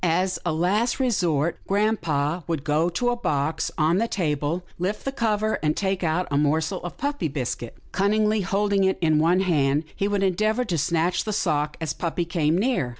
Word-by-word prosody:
As 180 +2 +1
a 175 - 0
last 200 - +1
resort, 170 - +1
grampa 175 -6 0
would 160 -5 -2
go 155 +3 +1
to 245 +8 0
a - - 0
box 155 -9 -1
on 160 +4 +3
the 230 - +1
table, 160 -3 -1 0.2
lift 190 +4 -2
the 270 - -1
cover, 220 -4 0
and 155 0 0
take 190 -2 -1
out 170 +2 0
a 140 - +2
morsel 160 +5 0
of 175 - -6
puppy 285 - -1
biscuit. 125 -4 -4
Cunningly 210 +2 +2
holding 200 +1 +1
it 190 0 +2
in 155 -3 +3
one 170 +4 +3
hand, 150 -5 +2
he 200 - 0
would 205 -1 0
endeavour 215 +6 +1
to 180 -6 -1
snatch 170 +3 +1
the 215 - -3
sock, 150 -7 0
as 160 -2 -2
puppy 170 0 -2
came 165 -1 +1
near. 215 - +1
175 Hz, 190 wpm, -24 LUFS, 155-205 Hz, 0.2 s, on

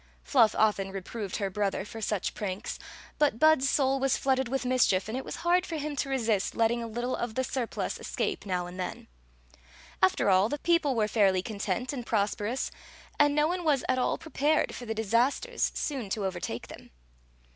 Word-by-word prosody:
Fluff 230 -6 +4
often 205 -3 +2
re 195 - -4
proved 200 0 -5
her 200 -2 -2
brother 200 -1 -1
for 225 +1 -8
such 210 -3 -1
pranks, 200 +1 -4 0.4
but 290 -6 +3
Bud 310 +1 +5
s 270 - +2
soul 270 0 +2
was 270 0 +2
flooded 265 -1 +1
with 265 +1 -2
mischief, 240 -7 +2
and 220 - -4
it 260 - -3
was - - -6
hard 355 +1 +4
for 335 - -5
him 300 0 -3
to 275 - -1
resist 225 -7 0
letting 230 +1 +2
a 230 - -4
little 240 +3 -2
of 240 -2 -4
the 260 - +1
surplus 250 -2 -3
escape - - -2
now 180 -3 -2
and 180 +1 -9
then. 180 - -5 0.9
After 190 +1 +3
all, 190 +3 +4
the 290 - -2
people 325 -4 +2
were 215 -2 +2
fairly 195 -4 +3
content 215 +5 -3
and 250 -3 -4
pros 210 -3 +1
perous, 225 +6 -3 0.5
and 290 0 +4
no 300 0 +3
one 355 +1 -2
was 295 -5 +2
at 255 0 +1
all - - +1
prepared 310 -1 0
for 245 - -8
the 225 - -2
disas 230 +5 +2
ters - - -1
soon 265 -9 -3
to 200 0 -2
overtake 175 -10 -4
them. - - -12
235 Hz, 205 wpm, -29 LUFS, 205-270 Hz, 0.9 s, Bud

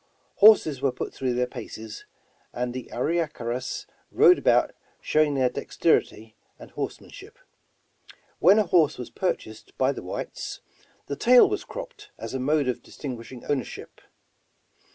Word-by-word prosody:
Horses 180 -10 +6
were 135 - +2
put 125 - -6
through 130 -2 -2
their 125 0 +1
paces, 110 -3 -9 0.5
and 125 0 -3
the 125 -1 -7
Arie 160 +8 -1
karas 125 -2 -5 0.3
rode 360 - +6
about - - +3 0.3
showing 150 -2 +1
their 130 -2 +3
dexterity 110 -2 -1 0.2
and - - -13
horse - - -4
manship. 420 +5 -14 1.0
When 200 - +6
a 215 - +4
horse 165 -4 +3
was 125 - -8
purchased 110 - -4
by - - +2
the - - -7
whites, - - -6 0.5
the 140 - -4
tail 250 - +6
was 410 +1 -3
cropped - - -9
as - - -7
a 130 - -2
mode 145 +1 +1
of 125 - -2
distinguishing 125 -2 -8
owner 140 -3 0
ship. - - -11
135 Hz, 150 wpm, -25 LUFS, 125-185 Hz, 1.0 s, Horses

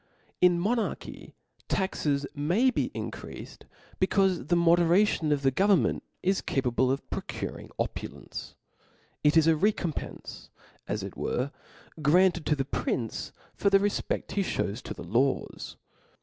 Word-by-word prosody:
In 180 -1 +7
a - - -1
monarchy 225 +5 -2 0.3
taxes 145 -7 0
may 175 - +2
be - - -1
increafed, - - -7 0.3
becaufe 185 -6 +2
the 175 - +3
moderation 170 0 +4
of 145 -1 +1
the 135 - +4
government 195 +6 +3 0.2
is 190 +1 +2
capable 130 -1 +1
of 135 +2 -2
procuring - - -5
opulence: - - -5 0.7
it 150 +2 +5
is 160 - +6
a 165 -1 +5
recompence, 180 -2 -2 0.4
as - - -2
it - - -7
were,' 130 +3 -2 0.5
granted 175 +3 +4
to 150 - +3
the 135 -2 -1
prin<e 115 -4 -2 0.2
for 200 - +1
the 195 - +6
refpecl 205 +1 -1
he 200 - 0
(hews 110 - -2
to - - -7
the - - -8
laws. 130 +4 -1
170 Hz, 135 wpm, -28 LUFS, 140-190 Hz, 0.7 s, In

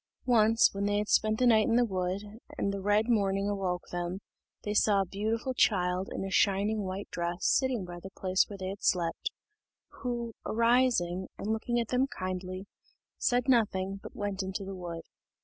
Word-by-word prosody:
Once, 225 -2 +4
when 200 0 -2
they 205 0 +1
had 210 0 -1
spent 215 0 +3
the 255 - +2
night 220 -3 +5
in 230 - +2
the 245 0 +4
wood, 185 -1 -2 0.3
and 200 - 0
the 200 - -4
red 205 +3 +2
morning 200 -4 +1
awoke 190 -3 -1
them, 175 +1 -3 0.5
they 210 - -2
saw 205 -1 +4
a - - -1
beautiful 220 +7 -2
child 185 -5 +2
in - - -3
a 195 - -5
shining 205 +2 +2
white 190 +2 -4
dress, 175 0 -3
sitting 255 -7 +2
by 175 0 -8
the 190 - -8
place 185 0 +2
where 200 - -7
they 185 -1 -4
had 195 +1 -7
slept, 170 -2 0 0.7
who, 240 -2 -3
arising, 230 -6 +2
and 215 +2 -1
looking 240 +2 -1
at 230 - -2
them 255 +2 +2
kindly, 185 -2 -5 0.5
said 245 0 +1
nothing, 195 -6 +2
but - - -10
went 205 -1 -2
into 190 +1 -4
the 195 - -6
wood. 170 -2 -6
200 Hz, 185 wpm, -30 LUFS, 185-225 Hz, 0.7 s, night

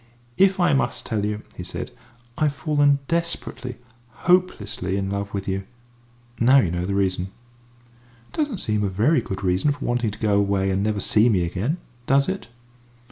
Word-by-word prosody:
"If 190 0 +5
I 175 -4 +4
must 135 - 0
tell 110 -3 -1
you," 105 +1 -2
he - - -7
said, - - -5 0.4
"I've 150 -1 +1
fallen 145 -1 +3
desperately, 170 -7 -2 0.5
hopelessly, 180 - +1
in 95 0 -2
love 100 0 -3
with 100 -1 -4
you. 95 0 -1 0.8
Now 130 +4 +6
you 95 -11 +3
know 90 0 -2
the 100 - -1
reason." 95 -2 +1 1.0
"It - - -14
doesn't 290 - -1
seem 105 -1 0
a 100 - +1
very 115 - +3
good 100 -4 -5
reason 95 +10 +2
for 145 0 -5
wanting 120 -2 +1
to 105 - -8
go 105 -2 +2
away 100 -1 +1
and 95 +1 0
never 105 -1 0
see 110 +3 +4
me 95 -6 +2
again. 95 - -1 0.3
Does 140 +1 +4
it?" 190 +1 -3
110 Hz, 180 wpm, -23 LUFS, 100-145 Hz, 1.0 s, Now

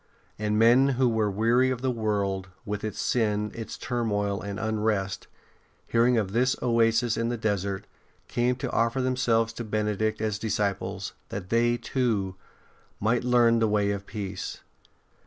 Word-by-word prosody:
And 105 0 0
men 120 +4 +6
who 130 -1 +4
were 110 -3 +1
weary 115 +6 +3
of 130 -1 -3
the 130 - +2
world, 100 -4 -1 0.2
with 105 0 -4
its 110 -2 -4
sin, 105 -3 0
its 115 -1 -6
turmoil 105 -5 -1
and 100 0 -5
unrest, 105 -3 -1 0.6
hearing 120 +1 +3
of 100 -4 0
this 125 +4 +2
oasis 115 -1 +2
in 115 0 0
the 120 - -2
desert, 100 -3 -1 0.4
came 125 +1 +1
to 130 - -4
offer 115 +3 +1
themselves 115 -3 +1
to 120 - -5
Benedict 110 0 -1
as 105 -1 -1
disciples, 105 -3 -2 0.2
that 95 -2 -6
they, 120 +1 +3
too, 110 -8 -1 0.7
might 115 +4 +1
learn 120 -2 +4
the 115 - +3
way 105 -1 +2
of 100 0 -5
peace. 100 -3 -5
110 Hz, 155 wpm, -27 LUFS, 105-120 Hz, 0.7 s, men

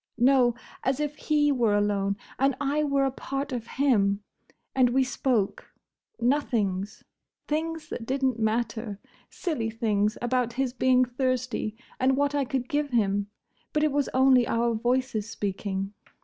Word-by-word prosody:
No! 245 -1 +4 0.3
As 265 +1 0
if 295 -1 -2
he 295 -1 +2
were 235 -6 +2
alone, 200 -1 +1 0.2
and 270 0 +3
I 285 +2 +1
were 280 -2 +2
a 270 - +1
part 275 +2 -4
of 240 -3 -4
him. 205 -7 +3 0.5
And 255 -2 +4
we 265 +2 +3
spoke. 250 -5 -1 0.5
Nothings. 215 -7 0 0.4
Things 320 +1 -2
that 230 - -6
didn't 265 -3 0
matter. 220 -1 -1 0.3
Silly 275 - -2
things; 215 -2 0
about 245 -1 0
his 260 0 -1
being 255 0 +4
thirsty, 250 -3 -2 0.2
and 265 +1 +3
what 285 0 +1
I 285 -2 +1
could 255 -1 -2
give 290 +1 0
him. 205 -4 +1 0.5
But 300 - +2
it 305 - +3
was 285 0 0
only 260 -2 +5
our 235 0 +1
voices 240 -2 0
speaking. 195 -1 -3
250 Hz, 150 wpm, -27 LUFS, 220-275 Hz, 0.5 s, only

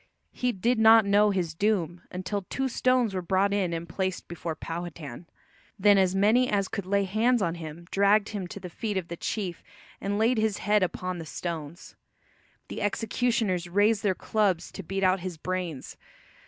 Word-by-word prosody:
He 250 0 -1
did 230 +4 0
not 220 -1 +7
know 205 +1 +4
his 180 -5 -1
doom 175 -3 0
until 185 +3 -3
two 270 0 -1
stones 255 -3 +2
were 185 - -2
brought 190 +3 +1
in 195 -4 0
and 165 0 -4
placed 185 +2 -3
before 170 -1 -5
Powhatan. 165 -3 -7 0.5
Then 200 0 +5
as 190 0 +2
many 220 +6 +4
as 200 -2 +1
could 200 -4 -5
lay 200 +1 +2
hands 225 +6 +2
on 170 -5 0
him 165 0 -8
dragged 200 +1 +3
him 200 -4 -4
to 200 - -8
the 185 - -7
feet 210 +2 -3
of 180 -3 -3
the 170 - -4
chief 180 -1 -4 0.4
and 200 +1 -1
laid 225 +2 +2
his 215 -2 +1
head 210 0 +2
upon 185 0 -2
the 165 - -6
stones. 165 +1 -6 0.7
The - - -6
executioners 210 -4 0
raised 205 +3 +3
their 200 -4 +1
clubs 195 -5 0
to - - -7
beat 195 +2 -3
out 185 0 +3
his 180 -2 -6
brains. 175 -4 -4
195 Hz, 180 wpm, -27 LUFS, 175-210 Hz, 0.7 s, not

